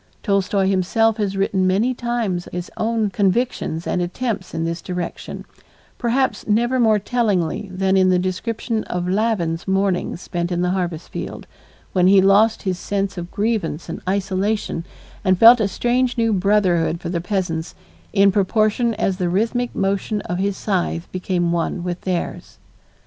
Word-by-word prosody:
Tolstoy 200 Hz, -1 st, +1 dB
himself 195 Hz, +4 st, +2 dB
has 200 Hz, -2 st, -1 dB
written 195 Hz, -1 st, +1 dB
many 210 Hz, +7 st, +2 dB
times 235 Hz, -8 st, -2 dB
his 180 Hz, 0 st, -5 dB
own 220 Hz, -2 st, 0 dB
convictions 195 Hz, -4 st, 0 dB
and 180 Hz, -, 0 dB
attempts 195 Hz, +1 st, -3 dB
in 165 Hz, 0 st, -2 dB
this 165 Hz, +1 st, -3 dB
direction, 180 Hz, -2 st, -5 dB, 0.5 s
perhaps 255 Hz, +2 st, 0 dB
never 240 Hz, +4 st, +2 dB
more 220 Hz, -3 st, +4 dB
tellingly 205 Hz, -5 st, -1 dB
than 190 Hz, +1 st, +1 dB
in 185 Hz, -1 st, +4 dB
the 185 Hz, -, +4 dB
description 220 Hz, +5 st, -2 dB
of 180 Hz, 0 st, -3 dB
Lavin's 185 Hz, -4 st, 0 dB
morning 190 Hz, -2 st, 0 dB
spent 175 Hz, 0 st, -4 dB
in 175 Hz, 0 st, 0 dB
the 180 Hz, -, +1 dB
harvest 175 Hz, -3 st, -3 dB
field, -, -, -6 dB, 0.5 s
when 180 Hz, -1 st, +4 dB
he 195 Hz, +1 st, +7 dB
lost 205 Hz, +4 st, +4 dB
his 185 Hz, -2 st, -2 dB
sense 200 Hz, -1 st, -2 dB
of 175 Hz, -1 st, -6 dB
grievance 200 Hz, -8 st, -2 dB
and 165 Hz, -, -5 dB
isolation 195 Hz, -1 st, -1 dB, 0.4 s
and 185 Hz, -1 st, +3 dB
felt 235 Hz, +4 st, +8 dB
a 215 Hz, -, +2 dB
strange 245 Hz, +5 st, 0 dB
new 230 Hz, -1 st, +2 dB
brotherhood 185 Hz, -4 st, +2 dB
for 170 Hz, -, -5 dB
the 170 Hz, -1 st, -2 dB
peasants, 175 Hz, -4 st, -2 dB, 0.4 s
in 200 Hz, -1 st, +5 dB
proportion 215 Hz, +4 st, +1 dB
as 195 Hz, -3 st, 0 dB
the 180 Hz, -2 st, 0 dB
rhythmic 230 Hz, +6 st, 0 dB
motion 200 Hz, +2 st, -1 dB
of 175 Hz, +1 st, -4 dB
his 195 Hz, 0 st, -1 dB
scythe 180 Hz, -4 st, -2 dB
became 180 Hz, -2 st, -1 dB
one 170 Hz, +1 st, -1 dB
with 175 Hz, 0 st, -4 dB
theirs. 180 Hz, -2 st, -4 dB
195 Hz, 160 wpm, -21 LUFS, 180-220 Hz, 0.5 s, felt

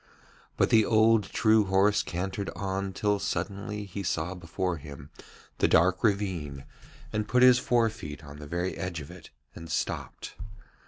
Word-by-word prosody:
But -, -, +2 dB
the 110 Hz, -1 st, +6 dB
old 110 Hz, 0 st, +4 dB
true 110 Hz, -1 st, +3 dB
horse 100 Hz, +2 st, +3 dB
cantered 95 Hz, +3 st, -4 dB
on 95 Hz, +1 st, -3 dB
till 105 Hz, +1 st, 0 dB
suddenly 100 Hz, +1 st, -3 dB
he 100 Hz, +1 st, -6 dB
saw 85 Hz, -1 st, -2 dB
before 90 Hz, 0 st, -3 dB
him 70 Hz, 0 st, -11 dB, 0.5 s
the -, -, +4 dB
dark 90 Hz, +3 st, +3 dB
ravine 90 Hz, -10 st, -1 dB, 0.5 s
and 105 Hz, 0 st, -1 dB
put 125 Hz, +1 st, +3 dB
his 125 Hz, -1 st, +7 dB
forefeet 105 Hz, -, -1 dB
out 70 Hz, -, -11 dB
on 70 Hz, -, -10 dB
the 75 Hz, -, -9 dB
very 85 Hz, +4 st, -2 dB
edge 90 Hz, -3 st, -4 dB
of 75 Hz, +2 st, -9 dB
it 90 Hz, -2 st, -13 dB, 0.2 s
and 85 Hz, 0 st, -10 dB
stopped. 80 Hz, -, -3 dB
95 Hz, 160 wpm, -28 LUFS, 85-105 Hz, 0.5 s, his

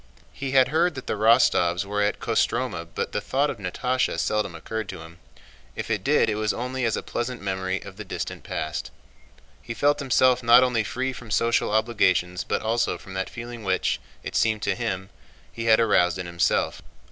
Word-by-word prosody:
He 135 Hz, -1 st, -4 dB
had 130 Hz, -1 st, +5 dB
heard 165 Hz, +2 st, +2 dB
that 130 Hz, -, -7 dB
the -, -, -1 dB
Rostóvs 105 Hz, -5 st, +3 dB
were 105 Hz, +1 st, -1 dB
at 105 Hz, 0 st, 0 dB
Kostromá -, -, -1 dB
but -, -, -2 dB
the 105 Hz, -, -2 dB
thought 135 Hz, +8 st, 0 dB
of -, -, -9 dB
Natásha 125 Hz, +7 st, -1 dB
seldom 105 Hz, 0 st, -1 dB
occurred 110 Hz, -2 st, -5 dB
to -, -, -7 dB
him. 85 Hz, +1 st, -13 dB, 0.6 s
If -, -, -5 dB
it -, -, -1 dB
did -, -, +3 dB
it 110 Hz, -, +1 dB
was 110 Hz, 0 st, 0 dB
only 125 Hz, +1 st, -2 dB
as 115 Hz, -, 0 dB
a -, -, -4 dB
pleasant 120 Hz, 0 st, -3 dB
memory 95 Hz, -1 st, -2 dB
of 100 Hz, -1 st, -11 dB
the 105 Hz, -, -6 dB
distant 95 Hz, -, -5 dB
past. 80 Hz, -, -4 dB, 0.7 s
He 115 Hz, 0 st, -7 dB
felt 145 Hz, +5 st, +2 dB
himself 130 Hz, -2 st, +3 dB
not 120 Hz, +1 st, +7 dB
only 125 Hz, -3 st, +1 dB
free 130 Hz, +5 st, -2 dB
from 120 Hz, -3 st, -10 dB
social 115 Hz, +2 st, +2 dB
obligations 95 Hz, -5 st, +1 dB
but -, -, -2 dB
also 115 Hz, +2 st, 0 dB
from 95 Hz, -, -12 dB
that 95 Hz, 0 st, -3 dB
feeling 120 Hz, -1 st, -8 dB
which, 95 Hz, -1 st, 0 dB, 0.2 s
it -, -, -6 dB
seemed 110 Hz, -1 st, +1 dB
to -, -, +1 dB
him, 95 Hz, -6 st, -4 dB, 0.4 s
he 115 Hz, -, -5 dB
had 110 Hz, -1 st, +5 dB
aroused 90 Hz, -6 st, +3 dB
in 90 Hz, -, -4 dB
himself. 85 Hz, 0 st, 0 dB
110 Hz, 195 wpm, -25 LUFS, 95-125 Hz, 0.7 s, not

